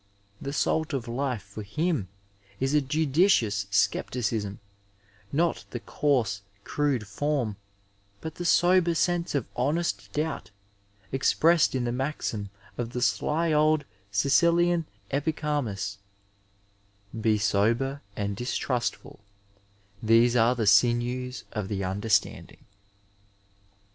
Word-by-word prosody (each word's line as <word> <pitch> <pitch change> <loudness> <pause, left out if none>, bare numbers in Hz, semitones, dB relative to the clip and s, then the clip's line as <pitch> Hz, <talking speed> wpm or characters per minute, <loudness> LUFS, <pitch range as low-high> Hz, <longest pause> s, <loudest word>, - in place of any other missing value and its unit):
The 140 - -4
salt 160 +2 0
of 130 -4 -2
Ufe 125 -1 -2
for 100 +2 -9
him 150 - -1 0.5
is 135 +2 0
a 150 - +4
judicious 135 - +2
scepticism, 105 0 0 0.7
not 165 +4 +1
the - - -5
coarse, 120 -9 0 0.2
crude 140 -7 0
form, 125 +1 -1 0.6
but 160 +6 -6
the 175 - -6
sober 175 0 +4
sense 175 -1 0
of 135 - 0
honest 150 +7 -1
doubt 150 0 -3 0.6
expressed 160 +4 +3
in 130 - 0
the 120 - -1
maxim 125 -6 -3 0.3
of 120 -1 -3
the 125 - -2
sly 160 +5 +1
old 155 0 +3 0.3
Sicilian 170 +9 +3 0.2
Epi 145 +3 0
charmus, 140 -12 -2 1.2
'^ - - -4
Be 110 -1 +3
sober 115 +7 +1
and 100 -1 -2
distrustfol; 120 -2 -2 0.8
these 115 +2 +4
are 120 +1 +4
the 115 -3 -1
sinews 120 +4 +2
of 105 -3 -3
the 100 -1 -2
understanding." 100 +2 -1
130 Hz, 115 wpm, -27 LUFS, 110-150 Hz, 1.2 s, a